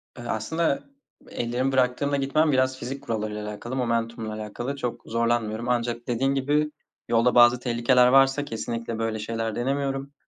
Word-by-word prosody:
Iıı, 120 Hz, -1 st, -8 dB
aslında 140 Hz, +8 st, 0 dB, 0.5 s
ellerimi 120 Hz, +3 st, -1 dB
bıraktığımda 130 Hz, +2 st, +1 dB
gitmem 145 Hz, +3 st, +2 dB
biraz 130 Hz, -1 st, +2 dB
fizik 135 Hz, +3 st, -6 dB
kurallarıyla 105 Hz, -4 st, -3 dB
alakalı 120 Hz, +4 st, -6 dB
momentumla 115 Hz, -3 st, -1 dB
alakalı 110 Hz, +5 st, -5 dB
çok 125 Hz, -4 st, -4 dB
zorlanmıyorum 115 Hz, 0 st, -1 dB
ancak 120 Hz, -1 st, -1 dB
dediğin 130 Hz, +3 st, +1 dB
gibi 145 Hz, +3 st, +1 dB, 0.4 s
yolda 115 Hz, +1 st, +3 dB
bazı 120 Hz, 0 st, +7 dB
tehlikeler 125 Hz, +1 st, +3 dB
varsa 135 Hz, +2 st, +4 dB
kesinlikle 115 Hz, -2 st, -4 dB
böyle 115 Hz, -1 st, -1 dB
şeyler 115 Hz, 0 st, -3 dB
denemiyorum. 135 Hz, +2 st, -2 dB
120 Hz, 140 wpm, -25 LUFS, 115-135 Hz, 0.5 s, bazı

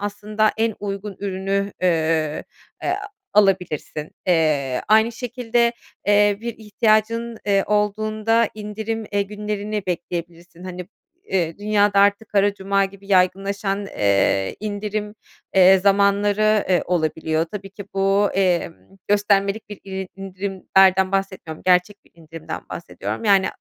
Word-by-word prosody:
aslında 210 Hz, +1 st, 0 dB
en 225 Hz, -1 st, 0 dB
uygun 200 Hz, -1 st, -5 dB
ürünü, 195 Hz, 0 st, -2 dB
eee, 160 Hz, -3 st, +1 dB, 0.4 s
e -, -, -2 dB
a -, -, -3 dB, 0.2 s
alabilirsin. 180 Hz, -6 st, +1 dB, 0.2 s
Eee, 150 Hz, -7 st, +2 dB
aynı 220 Hz, +2 st, +4 dB
şekilde, 240 Hz, -1 st, 0 dB, 0.3 s
eee, 205 Hz, 0 st, +4 dB
bir 235 Hz, -1 st, -4 dB
ihtiyacın, 220 Hz, +2 st, +1 dB
eee, 195 Hz, -1 st, +3 dB
olduğunda 215 Hz, +2 st, +1 dB
indirim, 220 Hz, +1 st, -4 dB
eee, 200 Hz, 0 st, +2 dB
günlerini 210 Hz, 0 st, -4 dB
bekleyebilirsin. 175 Hz, 0 st, -5 dB
Hani, 180 Hz, -1 st, -7 dB, 0.4 s
eee, 170 Hz, -2 st, -1 dB
dünyada 205 Hz, -1 st, +3 dB
artık, 200 Hz, +2 st, +2 dB
"Kara 205 Hz, 0 st, +2 dB
Cuma" 195 Hz, 0 st, +1 dB
gibi 195 Hz, 0 st, -10 dB
yaygınlaşan, 195 Hz, +1 st, +1 dB
eee, 100 Hz, -, +1 dB
indirim, 210 Hz, 0 st, -4 dB, 0.4 s
eee, 190 Hz, 0 st, +7 dB
zamanları, 205 Hz, +2 st, +3 dB
eee, 180 Hz, -, +3 dB
olabiliyor. 160 Hz, -2 st, 0 dB
Tabii 195 Hz, -1 st, -7 dB
ki 200 Hz, 0 st, -9 dB
bu, 195 Hz, +1 st, +2 dB
emm, 180 Hz, -3 st, +1 dB, 0.3 s
göstermelik 205 Hz, 0 st, +1 dB
bir 205 Hz, -, -9 dB
iri 190 Hz, -1 st, -5 dB
indirimlerden 190 Hz, 0 st, +2 dB
bahsetmiyorum. 190 Hz, -5 st, -3 dB
Gerçek 180 Hz, +3 st, +3 dB
bir -, -, -26 dB
indirimden 160 Hz, -1 st, -8 dB
bahsediyorum. 175 Hz, +6 st, -6 dB
Yani, 195 Hz, -2 st, +4 dB
200 Hz, 120 wpm, -21 LUFS, 185-210 Hz, 0.4 s, eee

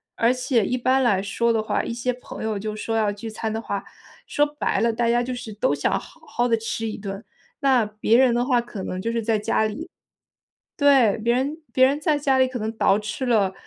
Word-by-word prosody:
而 230 Hz, +2 st, +3 dB
且 255 Hz, -2 st, +1 dB
一 250 Hz, -, -1 dB
般 260 Hz, +2 st, +2 dB
来 195 Hz, -6 st, +2 dB
说 235 Hz, +4 st, 0 dB
的 225 Hz, -1 st, +1 dB
话， 215 Hz, -, -1 dB
一 -, -, -4 dB
些 245 Hz, +1 st, -1 dB
朋 250 Hz, -2 st, -9 dB
友 220 Hz, -1 st, -1 dB
就 215 Hz, +2 st, -4 dB
说 225 Hz, +1 st, -3 dB
要 215 Hz, -2 st, +2 dB
聚 205 Hz, +2 st, -7 dB
餐 220 Hz, 0 st, -4 dB
的 220 Hz, +1 st, -3 dB
话， 200 Hz, -3 st, -4 dB, 0.4 s
说 295 Hz, -, +2 dB
白 295 Hz, 0 st, -2 dB
了， 230 Hz, 0 st, +2 dB
大 235 Hz, +1 st, 0 dB
家 240 Hz, +1 st, +3 dB
就 255 Hz, +1 st, -3 dB
是 235 Hz, -2 st, -7 dB
都 205 Hz, -8 st, 0 dB
想 145 Hz, -, 0 dB
好 -, -, -16 dB
好 240 Hz, +1 st, -1 dB
地 230 Hz, -, +3 dB
吃 225 Hz, 0 st, -3 dB
一 215 Hz, -, -5 dB
顿。 195 Hz, +1 st, -7 dB, 0.3 s
那 265 Hz, -5 st, +3 dB
别 215 Hz, +2 st, +1 dB
人 255 Hz, -2 st, +5 dB
的 240 Hz, +1 st, +1 dB
话 250 Hz, -2 st, +2 dB
可 235 Hz, -5 st, -8 dB
能 185 Hz, 0 st, -4 dB
就 230 Hz, -, -2 dB
是 230 Hz, 0 st, -1 dB
在 220 Hz, 0 st, +1 dB
家 215 Hz, +1 st, +1 dB
里 305 Hz, +11 st, -5 dB, 0.9 s
对， 270 Hz, -9 st, +4 dB
别 235 Hz, +2 st, +1 dB
人 280 Hz, +5 st, -1 dB
别 260 Hz, 0 st, +5 dB
人 280 Hz, +3 st, 0 dB
在 305 Hz, -2 st, +1 dB
家 270 Hz, -2 st, +2 dB
里 260 Hz, 0 st, +4 dB
可 255 Hz, -1 st, -5 dB
能 220 Hz, 0 st, -3 dB
捯 195 Hz, -, +4 dB
饬 215 Hz, +5 st, -4 dB
了 210 Hz, -6 st, +2 dB
230 Hz, 260 characters per minute, -23 LUFS, 215-255 Hz, 0.9 s, 人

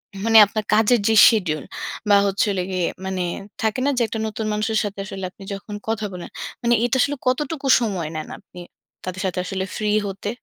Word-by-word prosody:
হুম, 195 Hz, -, -7 dB
মানে 225 Hz, -1 st, +6 dB
আপনার 215 Hz, +1 st, -3 dB
কাজের 225 Hz, +2 st, +4 dB
যে 225 Hz, -, +3 dB, 0.2 s
শিডিউল 175 Hz, -, -1 dB, 0.5 s
বা 205 Hz, -, +7 dB
হচ্ছিল 200 Hz, 0 st, 0 dB
গিয়ে, 185 Hz, -2 st, 0 dB, 0.2 s
মানে 190 Hz, -1 st, -2 dB, 0.4 s
থাকে 220 Hz, +3 st, 0 dB
না? -, -, +3 dB
যে, -, -, +2 dB
একটা 220 Hz, -, -4 dB
নতুন 220 Hz, 0 st, -4 dB
মানুষের 215 Hz, +1 st, 0 dB
সাথে 200 Hz, -1 st, -5 dB
আসলে 190 Hz, -1 st, -7 dB
আপনি 195 Hz, -, -14 dB
যখন 205 Hz, +1 st, -7 dB
কথা 220 Hz, -1 st, -1 dB
বলেন, 180 Hz, -1 st, -7 dB, 0.3 s
মানে 240 Hz, 0 st, +2 dB
এটা 245 Hz, -, 0 dB
আসলে 285 Hz, +2 st, +1 dB
কতটুকু 275 Hz, +2 st, -1 dB
সময় 190 Hz, -8 st, -2 dB
নেন 155 Hz, -, -4 dB
আপনি, 185 Hz, -2 st, -15 dB, 0.4 s
তাদের 185 Hz, 0 st, -5 dB
সাথে 185 Hz, -1 st, -2 dB
আসলে 190 Hz, 0 st, -3 dB
ফ্রি 210 Hz, -1 st, -1 dB, 0.2 s
হতে? 195 Hz, +1 st, -5 dB
210 Hz, 195 wpm, -22 LUFS, 190-225 Hz, 0.5 s, বা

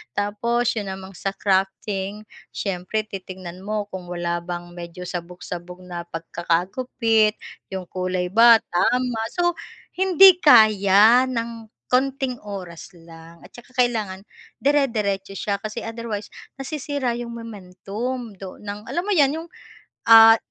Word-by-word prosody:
Tapos 235 Hz, +4 st, 0 dB
'yun 205 Hz, -3 st, -3 dB
namang 190 Hz, 0 st, -9 dB
sa 195 Hz, -, -2 dB
crafting, 195 Hz, +1 st, -1 dB, 0.3 s
siyempre 195 Hz, +2 st, -2 dB
titingnan 185 Hz, -2 st, -9 dB
mo 210 Hz, 0 st, -2 dB
kung 190 Hz, -1 st, -6 dB
wala 175 Hz, -1 st, -2 dB
bang 175 Hz, 0 st, -6 dB
medyo 175 Hz, 0 st, -8 dB
sabog-sabog 180 Hz, 0 st, -7 dB
na 175 Hz, -1 st, -6 dB
pagkakagupit, 210 Hz, +7 st, 0 dB, 0.3 s
'yung 190 Hz, -2 st, -5 dB
kulay 185 Hz, -1 st, -2 dB
ba, 230 Hz, +2 st, +7 dB
tama, 245 Hz, +5 st, +1 dB
so 350 Hz, -1 st, 0 dB, 0.4 s
hindi 380 Hz, 0 st, +7 dB
kaya 215 Hz, -1 st, +6 dB
ng 230 Hz, -2 st, -5 dB, 0.2 s
konting 265 Hz, -1 st, 0 dB
oras 190 Hz, -4 st, -8 dB
lang 165 Hz, 0 st, -15 dB
at -, -, -15 dB
saka 245 Hz, +2 st, -15 dB
kailangan 215 Hz, -6 st, 0 dB, 0.4 s
dire-diretso 215 Hz, -9 st, 0 dB
siya 200 Hz, +1 st, -2 dB
kasi 215 Hz, +1 st, -6 dB
otherwise 225 Hz, -2 st, -5 dB, 0.3 s
nasisira 285 Hz, -2 st, -3 dB
'yung 240 Hz, -1 st, -6 dB
momentum 225 Hz, +3 st, -6 dB
do 190 Hz, -1 st, -8 dB
ng 210 Hz, +1 st, -8 dB
alam 345 Hz, -, -2 dB
mo 415 Hz, -, -1 dB
'yan, 290 Hz, -4 st, +3 dB
'yung, 325 Hz, +1 st, -7 dB, 0.6 s
ah, 225 Hz, 0 st, +10 dB
210 Hz, 125 wpm, -22 LUFS, 185-240 Hz, 0.6 s, ah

